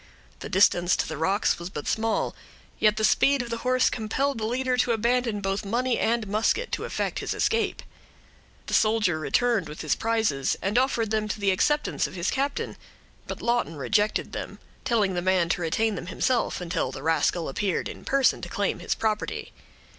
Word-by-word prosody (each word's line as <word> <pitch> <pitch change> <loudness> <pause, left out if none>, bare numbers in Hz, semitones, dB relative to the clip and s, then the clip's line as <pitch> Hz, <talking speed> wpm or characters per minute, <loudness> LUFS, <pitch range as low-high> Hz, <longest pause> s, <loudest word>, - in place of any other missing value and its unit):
The - - -7
distance 180 -2 +4
to - - -1
the 160 - -4
rocks 190 +8 +1
was 170 +1 -6
but 150 -5 -6
small, 225 0 0 0.4
yet 215 0 +3
the 220 - -1
speed 275 +4 +4
of 235 - -8
the 230 - -1
horse 255 +1 +2
compelled 260 +4 -1
the 215 - -1
leader 255 +2 0
to 245 -1 +2
abandon 235 -1 0
both 195 +1 -1
money 240 +4 0
and 230 -1 +1
musket, 220 - 0
to - - -2
effect - - -2
his - - -3
escape. 450 -3 0 0.8
The - - -6
soldier 215 -7 +3
returned 220 +1 +1
with 150 - -7
his 155 - +1
prizes, 220 -12 0
and 205 +5 +1
offered 235 -4 0
them 215 -1 0
to 210 - -4
the 200 -1 +2
acceptance 295 +10 +1
of - - -11
his 175 0 -1
captain; 280 +1 -2 0.5
but - - -6
Lawton 235 -9 0
rejected 205 +9 0
them, - - -6 0.3
telling 220 -7 +2
the 175 - -1
man 185 -2 +2
to 175 - 0
retain 215 +7 +1
them 180 -3 -6
himself, 235 +6 0
until 175 -1 -2
the 135 - -8
rascal 165 +1 +1
appeared 190 +7 -1
in - - -9
person 275 -1 +2
to - - -6
claim - - -1
his - - -1
property. 215 -1 -2
215 Hz, 190 wpm, -26 LUFS, 185-240 Hz, 0.8 s, distance